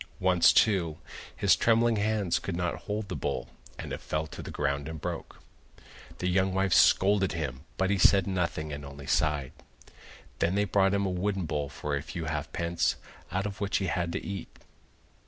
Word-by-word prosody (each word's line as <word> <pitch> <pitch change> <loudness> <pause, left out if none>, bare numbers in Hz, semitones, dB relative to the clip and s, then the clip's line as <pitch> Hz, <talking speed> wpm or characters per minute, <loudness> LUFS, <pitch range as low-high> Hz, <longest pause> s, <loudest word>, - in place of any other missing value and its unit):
Once, 90 -2 +5
too, 90 -7 +3 0.4
his - - +4
trembling 115 0 +3
hands 105 -3 +1
could 95 - -4
not 90 0 -1 0.2
hold 105 0 -2
the - - -4
bowl, - - -3 0.3
and - - -6
it - - -5
fell 75 0 -2
to 80 - -9
the - - -8
ground 70 +1 -1
and 80 -1 -6
broke. - - -6 0.8
The 90 - -2
young 95 +1 +2
wife 95 -1 +2
scolded 95 -2 +4
him, 75 -4 -4
but 95 +1 +1
he 100 - +1
said 95 +1 +5
nothing 85 -5 -2
and 70 0 -6
only 70 0 -9
sighed. 75 -2 +1 0.9
Then 85 +3 +1
they 105 0 +2
brought 100 0 +3
him 100 0 +1
a 95 - -1
wooden 95 0 -1
bowl 75 -2 -2
for 75 +1 -3
a 70 - -2
few 80 +2 -6
half 75 0 -3
pence, 85 0 0 0.4
out 95 +3 -1
of 100 -1 -5
which 100 0 +1
he 95 - -1
had 85 -2 -1
to - - -4
eat. 100 -3 -5
90 Hz, 190 wpm, -29 LUFS, 80-100 Hz, 0.9 s, Once